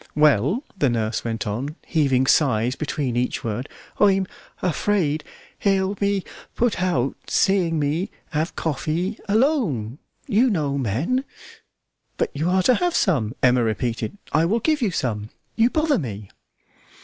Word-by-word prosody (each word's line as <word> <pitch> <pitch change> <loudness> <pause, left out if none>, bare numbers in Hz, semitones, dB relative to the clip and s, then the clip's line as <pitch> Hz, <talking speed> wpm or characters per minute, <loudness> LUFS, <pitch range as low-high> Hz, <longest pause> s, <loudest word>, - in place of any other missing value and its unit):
"Well," 150 - +3
the 145 -8 +2
nurse 110 -2 -1
went 115 -1 -3
on, 125 +9 -3
heaving 135 -5 +2
sighs 125 -4 +3
between 140 -4 -2
each 125 +1 -1
word, 115 +4 -3 0.3
"I'm 195 -2 +4 0.4
afraid 170 -4 +1 0.4
he'll 195 -1 +2
be 200 -1 0 0.3
put 235 -6 +1
out 140 -8 +1
seeing 180 -4 +2
me 155 +6 0 0.2
have 155 +2 -1
coffee 165 - -2
alone, 200 - +1 0.3
you 240 +5 +3
know 150 -9 0
men 140 - 0 0.5
" - - -50
"But - - 0
you 155 +5 0
are 185 0 +3
to 255 - +5
have 355 +6 0
some," 130 - +1
Emma 125 -1 +5
repeated; 115 - -2 0.2
"I 155 - +4
will 215 +7 +2
give 305 +4 +1
you 225 - +2
some. 110 - -2 0.3
You 230 +1 +4
bother 310 0 +2
me!" 105 - -6
155 Hz, 145 wpm, -23 LUFS, 125-200 Hz, 0.5 s, to